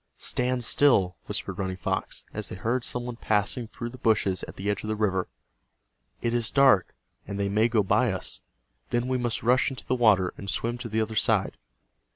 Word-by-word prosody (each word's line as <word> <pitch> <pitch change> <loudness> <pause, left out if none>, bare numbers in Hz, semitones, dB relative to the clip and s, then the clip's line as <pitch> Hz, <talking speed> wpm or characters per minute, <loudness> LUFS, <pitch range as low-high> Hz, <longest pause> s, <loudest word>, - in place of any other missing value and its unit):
"Stand 125 0 -1
still!" 100 -9 +3
whispered - - -4
Running 95 -1 -2
Fox, 95 - -3
as - - -4
they - - -6
heard 120 +6 -1
some 120 0 -2
one 120 -1 -6
passing 110 +2 0
through 120 +1 -6
the 130 - -12
bushes 100 -5 +2
at - - -10
the 100 - -5
edge 105 - 0
of - - -7
the 110 - -1
river. 95 -4 0 1.0
"It 115 - 0
is 120 -2 +1
dark, 135 -10 +4 0.3
and 100 - -4
they 100 0 0
may 110 +3 +3
go 115 -3 +2
by 120 +4 +2
us. 95 - -3 0.5
Then 120 +1 0
we 130 0 0
must 120 -2 -2
rush 125 +2 +3
into 135 - -8
the - - 0
water, 105 -7 +3
and 100 - -6
swim 120 +3 -2
to 120 -2 -5
the 110 +1 0
other 110 0 -3
side." - - +2
110 Hz, 205 wpm, -27 LUFS, 100-125 Hz, 1.0 s, dark